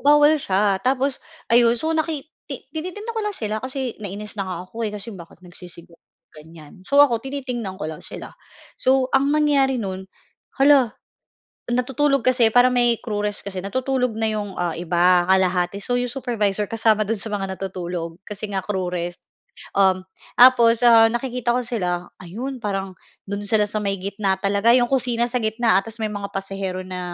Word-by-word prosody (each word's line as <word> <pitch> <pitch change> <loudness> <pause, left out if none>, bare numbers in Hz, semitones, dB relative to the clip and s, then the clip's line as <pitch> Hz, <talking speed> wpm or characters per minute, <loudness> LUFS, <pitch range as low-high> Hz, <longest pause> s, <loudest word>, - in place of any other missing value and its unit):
Bawal 295 +1 +5
siya. 195 -2 +1
Tapos 265 +3 0 0.3
ayun, 235 0 +5
so 315 +7 -1
naki 315 -3 -1 0.2
ti 275 -4 -6
tinitingnan 370 +8 -5
ko 445 - -1
lang 420 -2 -3
sila 215 -1 -3
kasi 260 -1 -4
nainis 205 +1 -6
na 195 - -1
nga 185 - -4
ako 230 +5 -7
eh, - - -3
kasi 210 +2 -7
iyon 195 - -10
bakit 170 - -18
nagsisigarliyo, 175 -1 -12 0.4
ganyan. 155 0 -14
So, 280 +5 +2
ako 235 -6 +2
tinitingnan 250 -8 -5
ko 180 - -4
lang 155 -1 -7
sila. - - -9 0.5
So, 260 0 +3
ang 275 +1 +3
nangyari 280 -4 +2
no'n, 190 -3 -5 0.5
hala 270 -3 +5 0.8
natutulog 265 +2 +1
kasi 245 -3 +4
para 245 +2 +4
may 240 -1 +3
crew 210 -3 -4
rest 205 -1 -3
kasi 190 -2 -4
natutulog 250 +3 -1
na 225 - 0
yung, 210 -3 -3
ah, 175 -2 -1
iba 175 +1 +2
kalahati. 185 0 +2
So, 245 +4 0
yung 245 - -2
supervisor 215 -6 -1
kasama 220 0 +1
do'n 225 +2 -1
sa 225 - -4
mga 195 -2 -3
natutulog 175 -3 -5
kasi 210 0 -6
nga 195 -1 -2
crew 190 -3 -2
rest. 175 0 -5 0.5
Uhm, 190 -1 +4 0.4
tapos, 240 -2 +6
ah, 230 -2 +7
nakikita 240 -1 -1
ko 250 - +1
sila 180 -7 -2
ayun 235 +10 -6
parang, 195 -4 -4 0.3
do'n 200 0 -4
sila 210 0 +2
sa 215 - -3
may 195 -2 -2
gitna 200 0 -1
talaga 200 +4 +3
yung 240 -1 +3
kusina 245 -2 +1
sa 250 - 0
gitna, 220 -2 +2
ah, - - +3
ta's 225 0 -7
may 215 - -1
mga 200 -1 -6
pasahero 195 -1 -4
na 185 0 -6
220 Hz, 180 wpm, -22 LUFS, 190-250 Hz, 0.8 s, ah